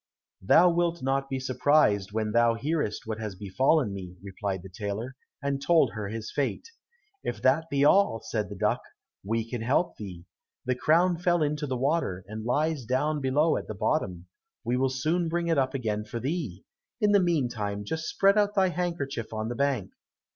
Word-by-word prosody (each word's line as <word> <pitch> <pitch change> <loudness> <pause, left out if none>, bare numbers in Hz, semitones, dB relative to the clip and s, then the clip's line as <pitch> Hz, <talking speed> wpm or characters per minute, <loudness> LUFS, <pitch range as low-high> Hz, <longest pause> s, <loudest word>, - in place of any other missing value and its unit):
"Thou 175 - +6
wilt 170 -2 0
not 135 +1 0
be 135 - -2
surprised 130 -7 +2
when 110 0 -1
thou 115 0 +4
hearest 145 -3 -2
what 110 -1 -4
has 105 -3 -5
befallen 105 - +1
me," 90 -2 -7
replied 95 -1 -4
the - - -8
tailor, 105 +7 -5 0.3
and 140 -1 -1
told 165 +3 +4
her 105 -2 -4
his 110 +1 -5
fate. 140 - -2 0.6
"If 120 - -3
that 155 +5 +3
be 140 -1 +2
all," 190 - +4
said 110 -2 -3
the 100 - -7
duck, - - 0 0.4
"we 115 +2 -1
can 120 -1 -4
help 135 +9 +1
thee. 90 -5 -8 0.4
The 125 - +1
crown 165 +6 +3
fell 175 -2 +2
into 150 0 -1
the 130 -1 -2
water, 130 - 0
and 110 +1 -6
lies 150 +4 0
down 145 +5 0
below 145 +5 +2
at - - -6
the 110 - -5
bottom; 90 - -1 0.4
we 120 +2 0
will 130 +1 +2
soon 155 +6 0
bring 170 0 -1
it 165 -4 +3
up 130 0 0
again 105 -5 -2
for 115 +2 -5
thee. 130 - -4 0.3
In 210 -2 +3
the 205 - +6
meantime 120 - -1
just 160 +8 -3
spread 195 +2 +4
out 205 0 +1
thy 190 -2 +4
handkerchief 170 -10 -3
on 110 0 -3
the 120 - -3
bank." 135 -7 0
130 Hz, 190 wpm, -27 LUFS, 110-160 Hz, 0.6 s, Thou